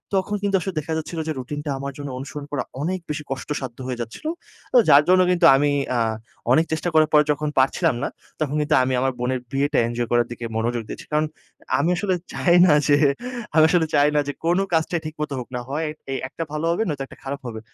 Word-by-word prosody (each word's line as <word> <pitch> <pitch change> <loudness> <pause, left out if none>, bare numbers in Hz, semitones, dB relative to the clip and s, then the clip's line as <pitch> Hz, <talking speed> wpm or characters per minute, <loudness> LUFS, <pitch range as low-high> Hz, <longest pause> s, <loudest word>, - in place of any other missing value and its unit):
তখন 195 +2 0
কিন্তু 200 -1 +1
আসলে 190 +1 -4
দেখা 155 +2 -4
যাচ্ছিলো 160 +1 -4
যে 155 - 0
রুটিনটা 145 +4 -5
আমার 140 +1 -5
জন্য 145 -1 -6
অনুসরণ 140 +2 -7
করা 145 - -1 0.2
অনেক 185 +4 -1
বেশি 150 0 -3
কষ্টসাধ্য 135 -3 -4
হয়ে 125 -2 -4
যাচ্ছিলো। 120 - -5 0.5
ও - - +9
যার 145 +1 +8
জন্য 185 +1 +6 0.4
আমি 145 +1 +2 0.3
আ - - +2 0.5
অনেক 160 +6 +5
চেষ্টা 160 +2 -1
করার 155 -1 +4
পর 150 - +8
যখন 150 +1 -1
পারছিলাম 130 -1 +2
না, - - +1 0.3
তখন 150 -2 -1
কিন্তু 150 +1 +2
আমি 130 0 0
আমার 135 0 +2
বোনের 125 +1 -1
বিয়েটা 140 +2 +1
enjoy 120 0 -2
করার 120 -1 +3
দিকে 120 0 -6
মনোযোগ 115 +1 -1
দিয়েছি। - - -7
কারণ, 150 +1 +2 0.5
আমি 155 +5 +2
আসলে 190 -1 0 0.2
চাই 175 -1 +3
না 165 - +5
যে 145 - +5 0.6
আমি 160 - +7
আসলে 170 -1 +3
চাই 145 0 +5
না - - +5
যে 145 - -2
কোনো 175 +3 +3
কাজটাই 165 +1 +1
ঠিকমত 150 -1 -4
হোক 125 - -6
না। 125 - -2
হয় 155 +3 -1 0.2
এই 135 - -1
একটা 165 - -5
ভালো 155 +1 -2
হবে, 175 - 0
নয়তো 145 -4 -2
একটা - - -14
খারাপ 140 +1 -4
হবে। 110 -2 -6
150 Hz, 215 wpm, -23 LUFS, 135-160 Hz, 0.6 s, ও